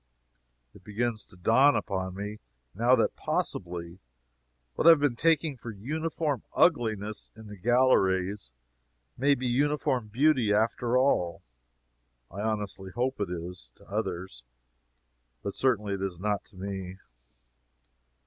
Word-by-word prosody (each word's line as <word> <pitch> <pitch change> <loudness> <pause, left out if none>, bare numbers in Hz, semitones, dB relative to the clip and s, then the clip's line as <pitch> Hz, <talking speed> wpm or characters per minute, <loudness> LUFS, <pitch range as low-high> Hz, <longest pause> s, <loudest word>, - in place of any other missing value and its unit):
It - - -17
begins 110 +2 -2
to 95 - -14
dawn 120 +10 +5
upon 95 -1 -2
me, 105 +2 -6 0.3
now, 120 +6 +4
that - - +1
possibly, 85 0 -3 0.7
what - - +1
I - - +12
have 165 -2 +8
been 145 -4 +1
taking 160 +1 +2
for 120 - -8
uniform 150 - -2
ugliness 110 - +1
in 110 0 -12
the 105 -1 -9
galleries 100 - +2 0.7
may 140 +3 +3
be 130 - -5
uniform 130 -2 +1
beauty 125 -1 +3
after 115 +3 +2
all. 90 -10 +1 0.9
I 95 - -8
honestly 105 -3 -3
hope 125 +3 -2
it 100 - -1
is, 85 -7 -7
to - - -20
others, 85 -8 -4 1.0
but 100 - -3
certainly 105 -6 +1
it 95 - -4
is 95 -3 -3
not 105 +1 -1
to - - -23
me. 95 -1 -6
105 Hz, 130 wpm, -28 LUFS, 95-130 Hz, 1.0 s, I